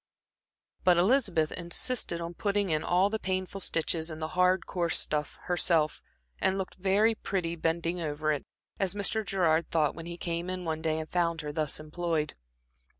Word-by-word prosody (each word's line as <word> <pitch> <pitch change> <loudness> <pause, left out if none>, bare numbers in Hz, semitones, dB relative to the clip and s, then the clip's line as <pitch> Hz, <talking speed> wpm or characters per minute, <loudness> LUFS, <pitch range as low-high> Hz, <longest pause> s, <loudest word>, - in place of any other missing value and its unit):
But 180 -2 +5
Elizabeth 185 - +3
insisted 175 +2 0
on 170 +1 -4
putting 200 0 0
in 155 -1 +1
all 185 +3 +3
the 220 - -1
painful 185 0 -2
stitches 165 -2 0
in 155 - -6
the 155 0 -4
hard, 180 +1 +3
coarse 170 -2 +1
stuff 150 -1 -1
herself, 165 -3 +2 0.4
and 190 - +2
looked 190 -1 -3
very 200 +4 +3
pretty 180 -5 -2
bending 170 +1 -1
over 155 -1 -1
it, 150 - -1 0.4
as 195 0 +1
Mr. 210 +2 +1
Gerard 170 -5 +1
thought 155 -3 +2
when 165 +1 -8
he 170 0 -6
came 170 +1 -3
in 185 -1 -4
one 160 -1 -2
day 160 -1 0
and 160 0 -4
found 170 -2 +1
her 150 -1 -4
thus 150 -1 0
employed. 155 -1 -2
170 Hz, 175 wpm, -29 LUFS, 160-185 Hz, 0.4 s, But